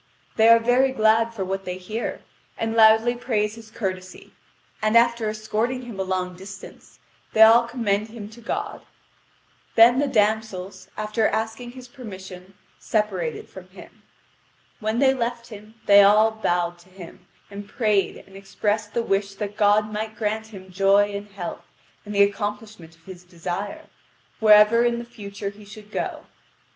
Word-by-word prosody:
They 220 Hz, 0 st, +4 dB
are 230 Hz, 0 st, +8 dB
very 245 Hz, +3 st, +2 dB
glad 225 Hz, -1 st, +2 dB
for 200 Hz, -5 st, -4 dB
what 195 Hz, +1 st, -3 dB
they 180 Hz, -1 st, -5 dB
hear, 215 Hz, +6 st, -5 dB, 0.4 s
and 225 Hz, 0 st, -2 dB
loudly 220 Hz, +1 st, +5 dB
praise 220 Hz, -4 st, -1 dB
his 225 Hz, -1 st, -13 dB
courtesy, 185 Hz, -4 st, -6 dB, 0.5 s
and 215 Hz, +2 st, +3 dB
after 235 Hz, -2 st, +2 dB
escorting 220 Hz, +4 st, -2 dB
him 235 Hz, -5 st, -9 dB
a -, -, 0 dB
long 185 Hz, -1 st, -3 dB
distance, 190 Hz, +1 st, -12 dB, 0.4 s
they 220 Hz, -, +7 dB
all 230 Hz, +2 st, +6 dB
commend 215 Hz, -4 st, -1 dB
him 220 Hz, -2 st, -9 dB
to 230 Hz, +2 st, -15 dB
God. 415 Hz, -, -4 dB, 0.9 s
Then 240 Hz, +3 st, +6 dB
the 290 Hz, -, +1 dB
damsels, 215 Hz, -5 st, -1 dB
after 215 Hz, +1 st, 0 dB
asking 225 Hz, +2 st, -4 dB
his 255 Hz, -1 st, -11 dB
permission, 190 Hz, -7 st, -11 dB, 0.2 s
separated 190 Hz, -7 st, -2 dB
from 185 Hz, -1 st, -13 dB
him. 185 Hz, -, -15 dB, 0.8 s
When 220 Hz, +1 st, -2 dB
they 265 Hz, +1 st, +4 dB
left 235 Hz, -2 st, -4 dB
him, 215 Hz, 0 st, -12 dB
they 200 Hz, 0 st, +8 dB
all 210 Hz, +2 st, +5 dB
bowed 175 Hz, -5 st, -1 dB
to 175 Hz, +2 st, -21 dB
him, 180 Hz, -2 st, -13 dB, 0.2 s
and 200 Hz, 0 st, -9 dB
prayed 210 Hz, -3 st, 0 dB
and 195 Hz, -, -18 dB
expressed 205 Hz, +2 st, -3 dB
the 235 Hz, -, +1 dB
wish 195 Hz, -1 st, -1 dB
that 205 Hz, 0 st, -5 dB
God 210 Hz, 0 st, +2 dB
might 215 Hz, +1 st, -4 dB
grant 220 Hz, 0 st, -2 dB
him 190 Hz, -3 st, -12 dB
joy 200 Hz, +2 st, +3 dB
and 200 Hz, +1 st, -6 dB
health, 195 Hz, -3 st, -8 dB, 0.4 s
and 210 Hz, -, -6 dB
the 200 Hz, -, +6 dB
accomplishment 205 Hz, -4 st, -4 dB
of 165 Hz, -, -29 dB
his 185 Hz, -2 st, -11 dB
desire, 180 Hz, +3 st, -6 dB, 0.5 s
wherever 215 Hz, +1 st, +6 dB
in 240 Hz, 0 st, +1 dB
the 235 Hz, -, -6 dB
future 200 Hz, -3 st, -7 dB
he 210 Hz, +1 st, -16 dB
should 205 Hz, +1 st, -13 dB
go. -, -, -4 dB
210 Hz, 160 wpm, -23 LUFS, 195-225 Hz, 0.9 s, are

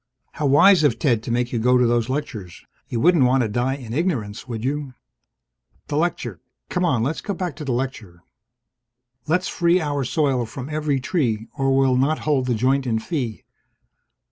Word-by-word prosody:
(How 150 Hz, -, -2 dB
wise 165 Hz, +6 st, +6 dB
of 140 Hz, -6 st, +3 dB
Ted 120 Hz, -9 st, +1 dB
to 115 Hz, -, -5 dB
make 120 Hz, +1 st, -1 dB
you 120 Hz, -, 0 dB
go 125 Hz, +3 st, +4 dB
to 125 Hz, -, +3 dB
those 120 Hz, 0 st, +1 dB
lectures! 120 Hz, -, -5 dB, 0.2 s
You 115 Hz, -, -2 dB
wouldn't 170 Hz, 0 st, +4 dB
want 130 Hz, +1 st, +3 dB
to -, -, 0 dB
die 120 Hz, +5 st, -1 dB
in 120 Hz, -5 st, -8 dB
ignorance, 130 Hz, -, -2 dB
would 115 Hz, -2 st, -5 dB
you?) 140 Hz, -1 st, -3 dB, 0.9 s
The 145 Hz, -, -2 dB
lecture 145 Hz, -, -2 dB, 0.3 s
come 180 Hz, -, -1 dB
on, 130 Hz, -10 st, +2 dB
let's 145 Hz, +6 st, -2 dB
go 200 Hz, -, -4 dB
back 180 Hz, -3 st, -4 dB
to 155 Hz, -, -6 dB
the 135 Hz, -, -2 dB
lecture! 120 Hz, -9 st, -4 dB, 1.0 s
Let's 180 Hz, +4 st, +1 dB
free 175 Hz, 0 st, +2 dB
our 145 Hz, -4 st, -1 dB
soil 130 Hz, -3 st, 0 dB
from 125 Hz, +4 st, -7 dB
every 150 Hz, -2 st, -1 dB
tree 120 Hz, -, -1 dB
or 135 Hz, -2 st, +1 dB
we'll 135 Hz, -2 st, +3 dB
not 145 Hz, +5 st, +2 dB
hold 140 Hz, -4 st, +1 dB
the 125 Hz, -, +1 dB
joint 130 Hz, +4 st, +1 dB
in 115 Hz, -2 st, +1 dB
fee. 120 Hz, -, -4 dB
135 Hz, 190 wpm, -22 LUFS, 120-150 Hz, 1.0 s, wise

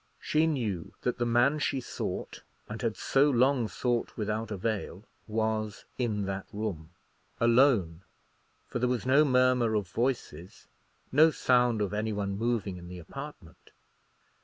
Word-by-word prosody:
She 155 Hz, +1 st, +2 dB
knew 110 Hz, -, -2 dB
that 125 Hz, 0 st, -2 dB
the 120 Hz, -, +1 dB
man 120 Hz, +6 st, +3 dB
she 140 Hz, -2 st, 0 dB
sought, 125 Hz, -, -5 dB, 0.3 s
and 105 Hz, 0 st, -6 dB
had 115 Hz, -2 st, -1 dB
so 140 Hz, +2 st, +3 dB
long 130 Hz, -2 st, +3 dB
sought 120 Hz, +1 st, -2 dB
without 110 Hz, 0 st, -2 dB
avail, 105 Hz, -2 st, -3 dB, 0.2 s
was 110 Hz, -1 st, -2 dB
in 105 Hz, -5 st, 0 dB
that 95 Hz, 0 st, -4 dB
room. 100 Hz, -7 st, -4 dB, 0.5 s
Alone; 115 Hz, -, +3 dB, 0.6 s
for -, -, -4 dB
there 125 Hz, +1 st, +1 dB
was 125 Hz, -2 st, -1 dB
no 135 Hz, +4 st, +5 dB
murmur 125 Hz, -4 st, +3 dB
of 105 Hz, -3 st, 0 dB
voices, 110 Hz, -, -3 dB, 0.5 s
no 155 Hz, +4 st, +6 dB
sound 125 Hz, -6 st, +2 dB
of 100 Hz, 0 st, -3 dB
any 110 Hz, +1 st, -1 dB
one 100 Hz, -1 st, -2 dB
moving 110 Hz, -4 st, -1 dB
in 85 Hz, -1 st, -10 dB
the 90 Hz, 0 st, -8 dB
apartment. 100 Hz, -, -10 dB
115 Hz, 145 wpm, -29 LUFS, 100-125 Hz, 0.6 s, no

